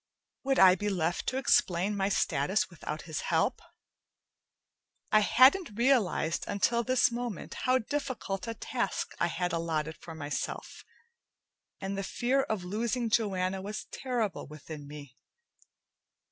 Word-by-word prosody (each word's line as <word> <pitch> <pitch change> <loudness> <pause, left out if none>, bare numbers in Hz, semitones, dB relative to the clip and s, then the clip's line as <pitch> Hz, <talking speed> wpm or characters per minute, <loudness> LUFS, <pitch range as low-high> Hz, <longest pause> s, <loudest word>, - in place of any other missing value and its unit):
Would 270 0 +2
I 185 -1 +8
be 205 +3 -1
left 175 -3 -1
to 260 - 0
explain 195 -6 +2
my 195 0 0
status 180 +2 +1
without 155 -2 -6
his 160 -2 -4
help? - - 0 1.5
I 215 - +7
hadn't 255 - +5
realized 225 - +2
until 235 +4 +1
this 255 0 +3
moment 240 -4 -5
how 255 0 +2
difficult 230 -7 -3
a 230 - -3
task 235 -2 -2
I 170 - +2
had 175 +1 -2
allotted 160 -2 -1
for 165 - -10
myself, 145 -2 -5 1.0
and 195 0 -3
the 195 - -2
fear 255 +7 +1
of 215 -7 -3
losing 225 +5 -1
Joanna 190 -4 +1
was 205 +2 -5
terrible 240 -6 -2
within 150 0 -9
me. 145 -3 -11
195 Hz, 130 wpm, -30 LUFS, 170-235 Hz, 1.5 s, I